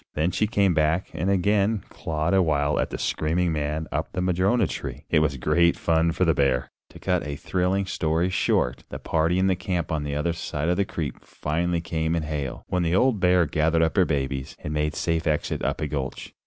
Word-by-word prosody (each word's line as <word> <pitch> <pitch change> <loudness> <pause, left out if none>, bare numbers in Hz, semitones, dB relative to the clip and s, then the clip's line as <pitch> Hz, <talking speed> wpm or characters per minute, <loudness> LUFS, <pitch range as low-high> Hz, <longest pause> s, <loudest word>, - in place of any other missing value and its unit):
Then 80 +4 +1
she 105 - +1
came 100 -4 +2
back 80 +3 +1
and 80 +4 -1
again 100 +2 +2
clawed 80 +2 -2
a 95 - +5
while 75 -3 +1
at - - 0
the - - -5
screaming 85 +2 0
man 75 +1 -2
up - - -3
the 90 - -1
madrona 95 +5 +2
tree. - - -6
It - - +5
was 75 -3 +1
great 85 +6 +3
fun 80 0 +2
for 90 +3 +1
the 80 - +4
bear! 65 -4 +1 0.2
To - - -13
cut 90 -4 0
a 70 - -4
thrilling 95 +5 0
story 85 0 0
short, 60 -8 +1
the - - -5
party 80 +2 0
in 95 0 +3
camp 90 -4 -2
on 80 -2 0
the 70 -1 -3
other 85 +3 0
side 80 -1 -3
of 90 - +1
the 100 - +2
creek 80 -6 -5
finally 85 +3 -2
came 80 0 -1
in 80 - -1
hail, 70 -5 -4
when 90 - 0
the 85 +1 +1
old 125 +1 +3
bear 90 -1 +4
gathered 80 +2 +2
up 80 - 0
her 95 -3 +5
babies 70 -2 -2
and 75 - -3
made 75 0 -1
safe 85 0 -1
exit 75 -1 -1
up - - -1
a 75 - 0
gulch. 70 -3 -5
80 Hz, 220 wpm, -25 LUFS, 75-90 Hz, 0.2 s, a